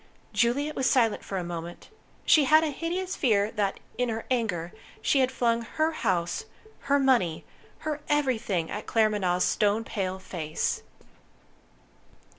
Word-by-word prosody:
Juliet 280 +6 +1
was 265 - +2
silent 230 -5 +2
for 195 - -4
a 180 - -2
moment. 170 0 -7 0.4
She 300 -3 +6
had 310 +4 +6
a 310 - 0
hideous 355 +5 -3
fear 210 -5 +2
that, 205 -3 -1 0.2
in 250 -1 +1
her 225 0 -3
anger, 185 -9 -1 0.3
she 280 - +2
had 260 0 +2
flung 235 -2 +1
Her 310 +7 -1
house, 185 - -1 0.3
Her 280 0 +2
money, 245 - +2 0.3
Her 305 -1 -4
everything, 235 - 0
at 210 - -5
Claremanagh's 205 -5 +2
stone 210 +1 +2
pale 190 -4 -3
face. 165 -5 -3
225 Hz, 140 wpm, -27 LUFS, 190-275 Hz, 0.4 s, She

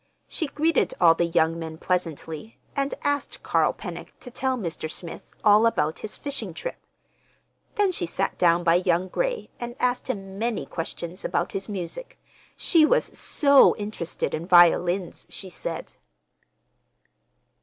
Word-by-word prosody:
She 320 - -2
greeted 315 +4 +1
all 165 -2 +7
the 170 +1 0
young 165 0 +2
men 160 -1 -6
pleasantly, 165 +2 -3 0.2
and 275 0 -1
asked 285 0 -2
Carl - - +2
Pennock - - -8
to 250 - -9
tell 260 +1 -1
Mr. 170 -6 -4
Smith 165 +1 -6
all 215 +2 +6
about 155 -8 0
his 215 - -6
fishing 285 -1 -5
trip. - - -5 1.0
Then 405 -2 +3
she 175 - -2
sat 195 +3 -1
down 175 0 +4
by 170 0 +4
young 180 +1 +1
Gray - - -2
and 240 0 -5
asked 250 0 0
him 195 -4 -5
many 230 0 -1
questions 170 +2 -6
about - - -1
his 195 +2 -4
music. 200 - -6 0.4
She 330 -3 +4
was 405 +11 +2
so 280 -2 +5
interested 205 -5 -3
in 165 +2 -3
violins, 175 0 +4
she 190 -2 -8
said. 170 -1 -5
195 Hz, 145 wpm, -25 LUFS, 170-255 Hz, 1.0 s, all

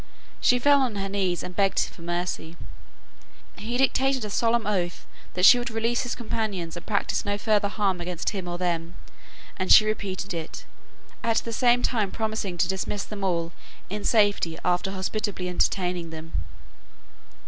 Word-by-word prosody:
She 250 - +4
fell 285 +2 +5
on 250 -5 0
her 195 -1 -2
knees 190 -3 -1
and 180 - -7
begged 195 -1 +2
for - - -15
mercy. 175 -1 -3 1.0
He 230 +4 -3
dictated 265 -1 +2
a 210 - -6
solemn 230 +1 +2
oath 180 -4 -1 0.3
that 180 0 +4
she 245 - +9
would 240 - -3
release 230 +1 0
his 245 - -3
companions 210 -8 -3
and 175 - -7
practise 200 -2 0
no 205 0 -1
further 210 -1 +2
harm 200 -3 0
against 175 -1 -2
him 190 -4 -5
or 175 0 -3
them; 170 -1 -2 0.6
and 185 -1 -1
she 215 - +9
repeated 200 -3 -3
it, 165 -2 -6 0.6
at 230 -1 +2
the 230 - -4
same 245 +1 +3
time 215 -6 +1
promising 215 -5 -3
to 170 - +2
dismiss 190 +2 -2
them 205 -2 -7
all 170 -3 0 0.4
in 210 0 -3
safety 205 -7 +2
after 180 +1 +1
hospitably 195 0 -3
entertaining 180 -1 0
them. 160 0 -9
200 Hz, 165 wpm, -26 LUFS, 180-220 Hz, 1.0 s, she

